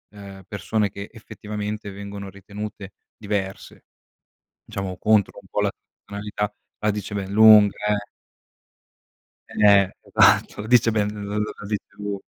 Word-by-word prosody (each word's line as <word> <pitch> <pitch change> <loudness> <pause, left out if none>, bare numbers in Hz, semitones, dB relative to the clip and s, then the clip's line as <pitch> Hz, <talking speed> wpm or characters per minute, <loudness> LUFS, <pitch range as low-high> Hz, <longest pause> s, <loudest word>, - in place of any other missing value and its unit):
ehm, 100 -1 -11
persone 100 +2 -1
che 100 +1 -8
effettivamente 105 -2 -6
vengono 100 0 -7
ritenute 100 0 -8 0.3
diverse, 100 -2 -4 0.8
diciamo 95 -2 -5
contro 105 -2 +2
un - - -21
po' - - -1
la - - +1 0.3
tonalità, 105 0 -4 0.3
la 105 - +2
dice 105 0 -4
ben 100 -1 -3
lunga 105 -1 +7 0.2
eh. 100 0 -3 1.5
Eh 100 -2 +6
esatto, - - +4
la 105 - -6
dice 115 -1 +5
bene, 105 -1 0
l 100 - -5
la 105 -1 -5
dice 105 0 -3
lu 100 -1 -4
105 Hz, 130 wpm, -23 LUFS, 100-105 Hz, 1.5 s, lunga